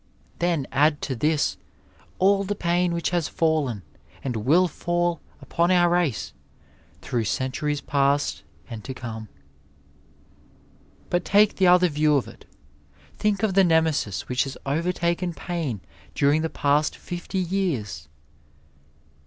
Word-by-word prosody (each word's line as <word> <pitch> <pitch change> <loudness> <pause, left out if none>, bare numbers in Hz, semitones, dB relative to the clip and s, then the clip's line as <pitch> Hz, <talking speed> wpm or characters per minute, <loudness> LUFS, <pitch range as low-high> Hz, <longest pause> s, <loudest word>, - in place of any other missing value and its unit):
Then 170 -5 +1
add 145 +2 +3
to 135 - -2
this 150 +5 +1 0.6
all 195 +1 +3
the 205 +1 -2
pain 175 -1 +1
which 170 +1 -1
has 175 -4 0
fallen 155 - 0 0.4
and 130 -3 -2
will 155 +12 +3
fall 175 0 -1 0.2
upon 170 +1 +1
our 175 -1 +4
race 145 - 0 0.7
through 120 -3 -2
centuries 135 +6 -2
past 140 0 +1 0.3
and 115 -4 -8
to 130 - -6
come." 110 -4 -7 1.8
But 175 0 +1
take 205 +3 +4
the 190 - +4
other 180 0 +6
view 150 -1 +2
of 135 - 0
it - - -14 0.4
— - - -29
^think 210 -1 0
of 210 -3 +2
the 195 +1 +5
Nemesis 160 - +1
which 125 +1 0
has 135 - -7
over 160 +6 0
taken 170 0 -1
pain 150 - -3 0.3
during 145 +2 +3
the 160 - -1
past 145 +1 +1
fifty 175 +2 -6
years 165 - -2
160 Hz, 135 wpm, -24 LUFS, 135-175 Hz, 1.8 s, other